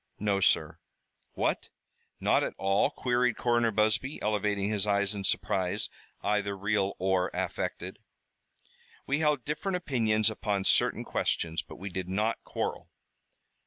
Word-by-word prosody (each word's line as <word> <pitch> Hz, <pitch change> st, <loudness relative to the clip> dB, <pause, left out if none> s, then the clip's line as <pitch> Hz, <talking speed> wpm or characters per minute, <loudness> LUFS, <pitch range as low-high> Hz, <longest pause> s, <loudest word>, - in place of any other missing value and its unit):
"No, 100 Hz, -1 st, +1 dB
sir." 80 Hz, -3 st, +2 dB, 0.5 s
"What, -, -, -1 dB, 0.5 s
not -, -, +3 dB
at -, -, -3 dB
all?" 95 Hz, +6 st, +2 dB
queried 125 Hz, -4 st, +1 dB
Coroner 120 Hz, -1 st, +2 dB
Busby, 110 Hz, +6 st, +1 dB
elevating 105 Hz, -1 st, 0 dB
his 105 Hz, -1 st, +1 dB
eyes 100 Hz, 0 st, +2 dB
in 100 Hz, -1 st, -4 dB
surprise, 95 Hz, -1 st, 0 dB, 0.3 s
either 100 Hz, -1 st, 0 dB
real 100 Hz, 0 st, 0 dB
or 95 Hz, -1 st, +1 dB
affected. -, -, -3 dB, 1.1 s
"We 140 Hz, +2 st, 0 dB
held 150 Hz, -4 st, +1 dB
different 150 Hz, +6 st, -2 dB
opinions 110 Hz, -, +1 dB
upon 105 Hz, -2 st, -1 dB
certain -, -, +3 dB
questions, 80 Hz, -2 st, -1 dB
but -, -, -12 dB
we 100 Hz, +2 st, -6 dB
did 90 Hz, 0 st, -4 dB
not 105 Hz, +4 st, 0 dB
quarrel." -, -, -4 dB
105 Hz, 130 wpm, -29 LUFS, 95-115 Hz, 1.1 s, not